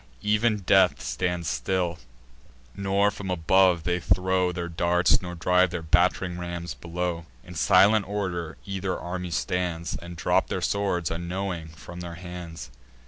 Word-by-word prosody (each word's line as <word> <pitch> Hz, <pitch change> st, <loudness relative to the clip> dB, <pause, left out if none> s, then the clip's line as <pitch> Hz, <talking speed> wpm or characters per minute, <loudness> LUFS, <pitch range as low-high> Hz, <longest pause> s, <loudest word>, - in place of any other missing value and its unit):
Ev'n 105 Hz, +1 st, +3 dB
death 95 Hz, -1 st, +4 dB
stands 85 Hz, +8 st, -2 dB
still; 90 Hz, -1 st, -1 dB, 0.8 s
nor 100 Hz, +1 st, +2 dB
from 100 Hz, -2 st, -7 dB
above 90 Hz, 0 st, +3 dB
they 90 Hz, +1 st, 0 dB
throw 90 Hz, +1 st, +2 dB
Their 85 Hz, 0 st, -4 dB
darts, 85 Hz, +1 st, +2 dB
nor 90 Hz, -1 st, -6 dB
drive 90 Hz, +2 st, +3 dB
their 85 Hz, -1 st, -4 dB
batt'ring 90 Hz, +2 st, +2 dB
rams 85 Hz, -3 st, -5 dB
below. 85 Hz, +4 st, -4 dB, 0.2 s
In -, -, -11 dB
silent 105 Hz, 0 st, +4 dB
order 90 Hz, -5 st, -3 dB
either 95 Hz, -2 st, -3 dB
army 90 Hz, 0 st, -4 dB
stands, 85 Hz, -2 st, -2 dB
And 85 Hz, +4 st, -8 dB
drop 80 Hz, -, +1 dB
their -, -, -2 dB
swords, 95 Hz, -5 st, 0 dB
unknowing, 85 Hz, 0 st, -3 dB
from 80 Hz, +3 st, -11 dB
their 85 Hz, -1 st, -6 dB
hands. 85 Hz, -6 st, -8 dB
90 Hz, 140 wpm, -26 LUFS, 85-95 Hz, 0.8 s, death